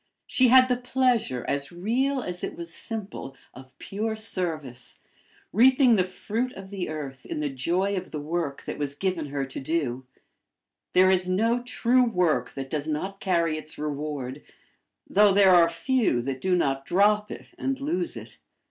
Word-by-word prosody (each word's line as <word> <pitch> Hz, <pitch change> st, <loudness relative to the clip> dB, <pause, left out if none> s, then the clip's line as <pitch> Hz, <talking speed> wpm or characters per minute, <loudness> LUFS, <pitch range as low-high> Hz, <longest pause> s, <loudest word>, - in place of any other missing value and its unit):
She 255 Hz, -, +3 dB
had 255 Hz, +1 st, +7 dB
the 250 Hz, -1 st, +1 dB
pleasure, 250 Hz, -, 0 dB
as 140 Hz, +2 st, -2 dB
real 245 Hz, +9 st, 0 dB
as 180 Hz, 0 st, -6 dB
it -, -, -4 dB
was 170 Hz, -1 st, -6 dB
simple, 205 Hz, -, -6 dB, 0.2 s
of 130 Hz, +1 st, -14 dB
pure 220 Hz, +2 st, -3 dB
service, 160 Hz, -, -3 dB, 0.5 s
reaping 255 Hz, +3 st, +6 dB
the 185 Hz, -, +3 dB
fruit 220 Hz, +7 st, -3 dB
of 190 Hz, 0 st, -10 dB
the 190 Hz, -5 st, -4 dB
earth 140 Hz, -4 st, -6 dB
in -, -, -5 dB
the 150 Hz, -2 st, -2 dB
joy 175 Hz, +9 st, 0 dB
of 185 Hz, -1 st, -4 dB
the 150 Hz, -, -5 dB
work 155 Hz, -1 st, -3 dB
that -, -, -6 dB
was 140 Hz, -1 st, -2 dB
given 180 Hz, -2 st, -2 dB
her 140 Hz, -1 st, -2 dB
to 135 Hz, -, -7 dB
do; 135 Hz, -4 st, -2 dB, 0.9 s
there 185 Hz, +1 st, +6 dB
is 185 Hz, -1 st, +1 dB
no 225 Hz, +6 st, +2 dB
true 245 Hz, +1 st, +2 dB
work 175 Hz, -, +1 dB
that 135 Hz, -1 st, -6 dB
does 150 Hz, -1 st, -2 dB
not 190 Hz, +6 st, -3 dB
carry 170 Hz, -5 st, +1 dB
its 155 Hz, -, -10 dB
reward 145 Hz, -2 st, -4 dB, 0.7 s
though 205 Hz, +1 st, +5 dB
there 195 Hz, -1 st, +6 dB
are 170 Hz, -1 st, +6 dB
few 235 Hz, -, +1 dB
that 130 Hz, 0 st, -4 dB
do 185 Hz, -1 st, +2 dB
not 135 Hz, -5 st, 0 dB
drop 210 Hz, +5 st, +2 dB
it -, -, -9 dB
and 270 Hz, 0 st, -1 dB
lose 325 Hz, +4 st, -2 dB
it. -, -, -10 dB
180 Hz, 175 wpm, -26 LUFS, 145-220 Hz, 0.9 s, had